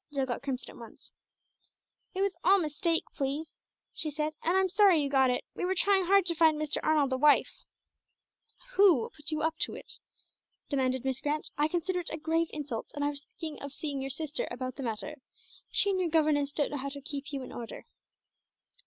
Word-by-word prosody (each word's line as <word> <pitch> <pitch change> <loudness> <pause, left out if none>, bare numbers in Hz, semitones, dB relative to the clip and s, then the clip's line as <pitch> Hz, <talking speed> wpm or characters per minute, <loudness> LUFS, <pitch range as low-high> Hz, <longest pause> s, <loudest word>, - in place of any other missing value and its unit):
Jill 275 -2 0
got 245 -2 -3
crimson 265 -2 -4
at - - -15
once. 230 -1 -13 1.0
"It 380 - -1
was 395 -2 +1
all 390 +2 +6
a - - +1
mistake, 325 +2 0
please," 290 +4 -3 0.4
she 310 - -2
said, 300 +1 -2
"and 345 +3 +2
I'm 380 0 +3
sorry 380 -2 +5
you 285 - +1
got 265 -2 +4
it. 250 - 0
We - - -5
were 370 +1 +1
trying 385 0 +3
hard 395 0 +5
to 345 - +3
find 315 -2 +4
Mr. 305 -1 -1
Arnold 295 -4 +2
a - - +1
wife." 295 +2 +3 1.1
"Who 375 - +5
put 300 0 -5
you 310 -1 -1
up 320 0 0
to - - 0
it?" - - -8 0.7
demanded 260 -2 0
Miss 265 -1 -1
Grant. 300 +1 -2
"I 295 +1 +2
consider 360 +2 -1
it 345 - -3
a 310 - -4
grave 325 +1 +1
insult, 285 -7 -4
and 290 0 -1
I - - +2
was 285 0 -6
thinking 315 -2 -5
of 280 -1 -6
seeing 285 -3 -3
your 270 - -3
sister 300 +2 -3
about 255 +1 -5
the - - -7
matter. 235 +5 -4 0.5
She 405 - +3
and 375 - 0
your 355 -2 +1
governess 300 -3 +2
don't 290 0 -1
know 290 - -2
how 280 +1 -3
to 280 +1 -7
keep 280 +1 -6
you 275 -2 -4
in - - -9
order." 230 -2 -7
300 Hz, 215 wpm, -30 LUFS, 275-330 Hz, 1.1 s, all